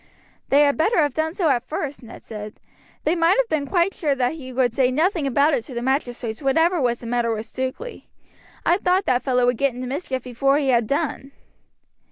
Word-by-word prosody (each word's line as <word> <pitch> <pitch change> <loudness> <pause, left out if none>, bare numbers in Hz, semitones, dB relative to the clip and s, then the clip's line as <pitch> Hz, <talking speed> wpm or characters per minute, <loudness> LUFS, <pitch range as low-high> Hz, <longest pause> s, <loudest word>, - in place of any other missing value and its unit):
"They 285 +2 +5
had 285 -1 +2
better 370 +9 +2
have 295 -5 +2
done 320 +3 -2
so 345 -6 +1
at 250 -3 +1
first," 290 -2 -4
Ned 235 - -12
said; 210 -1 -8 0.4
"they 315 - +1
might 335 +3 +3
have - - +2
been 295 -3 -1
quite 360 +3 +1
sure 295 -5 0
that 250 0 0
he 270 -5 -9
would 250 -2 +1
say 255 0 +2
nothing 315 +3 +1
about 285 +4 +3
it 235 - 0
to 255 - -9
the 235 - -2
magistrates 245 -3 -2
whatever 325 +5 +2
was 240 -2 0
the - - -9
matter 235 0 0
with 220 0 -3
Stukeley. 260 - -6 0.6
I 345 - +4
thought 370 +1 +1
that 250 0 +2
fellow 250 -2 +1
would 245 -1 +1
get 275 -1 0
into 255 +1 -5
mischief 260 -1 -4
before 275 +3 +1
he 280 -2 0
had 235 -3 +2
done." 280 -1 -2
275 Hz, 220 wpm, -22 LUFS, 245-315 Hz, 0.6 s, They